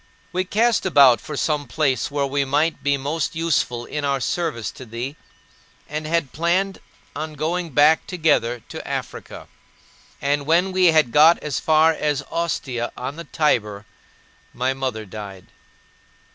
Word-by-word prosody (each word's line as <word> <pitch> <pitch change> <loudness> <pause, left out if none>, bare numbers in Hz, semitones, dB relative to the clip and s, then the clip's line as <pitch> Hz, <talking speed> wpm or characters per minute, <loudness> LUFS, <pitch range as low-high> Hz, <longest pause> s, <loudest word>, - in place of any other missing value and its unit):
We 185 +2 -1
cast 225 +4 +2
about 140 -9 +5
for 150 - -7
some 150 -3 -1
place 130 -3 0
where 140 -1 -1
we 140 +1 0
might 150 +4 0
be 140 0 +1
most 150 +5 -2
useful 145 -7 0
in 150 - -4
our 140 -1 0
service 130 -7 -2
to - - -11
thee, 120 +4 -6 0.7
and 155 +1 -4
had 165 -4 0
planned 180 +4 0 0.4
on 155 0 -5
going 170 +3 -2
back 150 +2 +4
together 145 -9 +1
to - - -8
Africa. - - -6 0.7
And 145 0 -1
when 175 +4 +3
we 185 0 +2
had 155 -7 +4
got 155 +5 +6
as 150 -4 -2
far 160 +1 +4
as 150 -3 -1
Ostia 135 -8 -2
on 130 +3 -5
the 170 +1 -8
Tiber, 105 -9 0 0.7
my 130 +2 0
mother 130 -5 -4
died. 100 -2 -9
150 Hz, 150 wpm, -22 LUFS, 130-165 Hz, 0.7 s, got